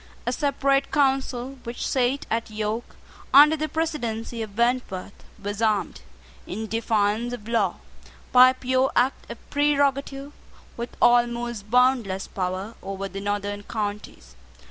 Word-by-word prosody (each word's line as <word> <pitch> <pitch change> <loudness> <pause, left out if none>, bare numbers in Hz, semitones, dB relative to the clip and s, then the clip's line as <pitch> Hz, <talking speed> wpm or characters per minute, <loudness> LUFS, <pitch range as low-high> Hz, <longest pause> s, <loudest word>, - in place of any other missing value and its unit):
A 245 - 0
separate 275 -1 +1
council 270 -2 0
which 235 0 -4
sate 260 +1 0
at 230 0 -1
York, 215 +2 -4 0.4
under 300 +3 +9
the 310 0 -3
presidency 240 -8 -3
of 210 -2 -7
Wentworth, 235 -5 -1 0.2
was 205 +2 -5
armed, 215 -3 0 0.5
in 220 +4 -4
defiance 225 +1 0
of 220 -3 -8
law, 230 0 +1 0.6
by 255 0 +8
a 260 - -1
pure 260 +1 +1
act 255 +2 +1
of 235 - -6
prerogative, 285 -1 +1 0.4
with 235 +1 -7
almost 240 -3 +2
boundless 245 -6 +2
power 185 +3 -3
over 195 +1 -5
the 195 0 -7
northern 205 0 -2
counties. 205 - -5
235 Hz, 130 wpm, -24 LUFS, 210-265 Hz, 0.6 s, under